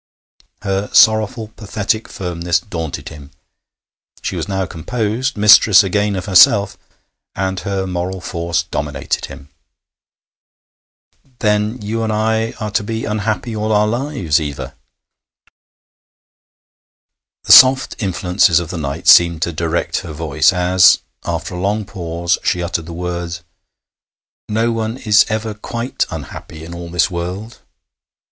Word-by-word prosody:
Her 100 0 -2
sorrowful, 110 0 +3
pathetic 110 0 -3
firmness 85 -2 -2
daunted 80 -7 -6
him. 75 -3 -12 0.9
She - - -3
was - - -4
now 95 -1 -2
composed, 110 +8 -3
mistress 105 0 +7
again 100 +1 0
of 95 -1 -4
herself, 100 +1 +5 0.6
and 95 0 -2
her 100 -2 -3
moral 90 +1 -4
force 85 -2 -2
dominated 75 -4 -3
him. 70 - -12 1.9
'Then, 105 +2 0
you 110 +2 -3
and 110 -1 -1
I 110 +1 0
are 105 -1 -4
to 105 - 0
be 110 +2 -4
unhappy 110 +2 -3
all 110 +1 -2
our 105 0 +3
lives, 115 - -1
Eva?' 75 -2 -6 2.7
The - - 0
soft 130 0 +7
influences 90 -3 +2
of 85 -2 -6
the 90 - -5
night 70 -2 -5
seemed 85 -2 +6
to 85 - -2
direct 85 +1 -2
her 85 -5 -8
voice 75 +1 +2
as, 90 0 +4 0.3
after 85 +1 -4
a 90 - -5
long 105 +2 -1
pause, 85 -2 -2
she 90 -2 0
uttered 85 -2 -3
the - - -7
words: 85 0 -5 1.1
'No 115 +2 0
one 115 +1 -3
is 110 -4 +3
ever 110 0 -3
quite 115 +4 -4
unhappy 80 0 -9
in 85 - -9
all 85 0 -8
this 85 +3 +1
world.' 90 +6 -6
95 Hz, 130 wpm, -17 LUFS, 85-110 Hz, 2.7 s, mistress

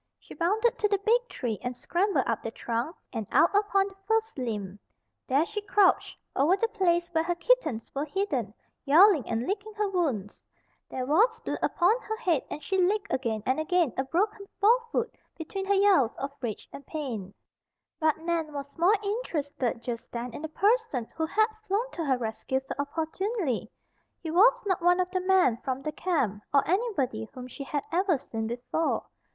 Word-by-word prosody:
She - - -13
bounded 440 +8 +1
to 420 - +3
the 405 -1 +2
big 485 +2 +3
tree 225 -5 -3
and 250 0 -4
scrambled 350 - +1
up 230 -1 -1
the - - -4
trunk 235 +8 -3 0.2
and 220 -4 -3
out 340 - +4
upon 400 -1 +3
the 390 - -12
first 445 0 +1
limb. 210 -6 -4 0.5
There 280 +5 +3
she 420 +2 -4
crouched, 405 -1 +3 0.2
over 315 +8 +4
the 460 - +1
place 345 -4 +1
where 320 -2 +1
her 350 +1 -1
kittens 335 - +1
were 280 +2 -1
hidden, 285 - -2 0.3
yowling 320 - +6
and 230 +2 -1
licking 415 +4 -4
her 420 -1 0
wounds. 285 - -2 0.5
There 255 -1 -3
was 435 - +3
blood - - -3
upon 410 +8 +2
her 440 - -4
head 340 - +1
and 300 - -6
she 385 +5 +1
licked 405 +3 +1
again 225 -5 -1
and 260 +3 +1
again 335 -4 +1
a 265 - 0
broken 400 +8 -1
forefoot 470 +2 +2 0.2
between 385 +4 -5
her 400 +1 +2
yowls 385 - +4
of 275 +1 -4
rage 230 -5 -4
and 280 - -9
pain. 240 - -4 0.7
But 315 -2 +2
Nan 325 -2 -2
was 280 0 -7
more 365 +6 +5
interested 295 - -2
just 235 -2 -5
then 240 0 -5
in - - -7
the 315 - -5
person 400 - +1
who 320 -1 -1
had 435 +6 +3 0.2
flown 435 +6 0
to 330 - -4
her 265 -3 +2
rescue 240 +3 -2
so 265 - -6
opportunely. 320 - -2 0.5
He 320 - -5
was 480 +8 +5
not 375 -4 0
one 355 +1 +4
of 365 0 0
the 370 -1 0
men 365 -11 +3
from 260 +2 -4
the 305 - -2
camp, 285 - -1
or 280 -1 +3
anybody 300 - 0
whom 250 -1 -7
she 265 +3 -8
had 285 +1 -3
ever 355 -1 +2
seen 225 -4 -5
before. 245 +7 -1
330 Hz, 185 wpm, -28 LUFS, 260-400 Hz, 0.7 s, yowling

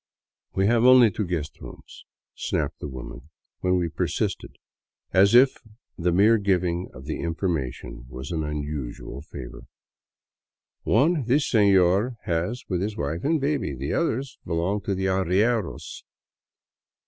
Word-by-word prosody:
" - - -58
We 95 - +2
have 115 +2 +3
only 125 -3 +7
two 100 0 -3
guest 80 -4 -4
rooms," - - -12 0.3
snapped - - -2
the - - -5
woman, 65 +2 -9 0.3
when 90 0 +1
we 90 -1 0
persisted, - - -3 0.6
as 100 +4 +5
if 130 +2 +6 0.4
the 90 0 0
mere 105 +6 +5
giving 90 -3 0
of 65 +2 -12
the 75 - -4
information 80 -8 -3
was 65 +4 -7
an 80 -2 -1
unusual 75 -3 -5
favor. - - -10 0.6
" - - -69 0.2
One 155 -3 +2
this 135 +5 +2
senor 100 +2 +3
has 85 +9 -2
with 90 -2 -1
his 105 +2 -3
wife 75 +4 -3
and 160 +2 +2
baby. 140 - -1
The 70 +3 -3
other 135 -6 0 0.2
belongs 85 +5 -1
to 100 - 0
the 95 +1 -2
arrieros." 95 +3 0
90 Hz, 145 wpm, -25 LUFS, 80-110 Hz, 0.6 s, only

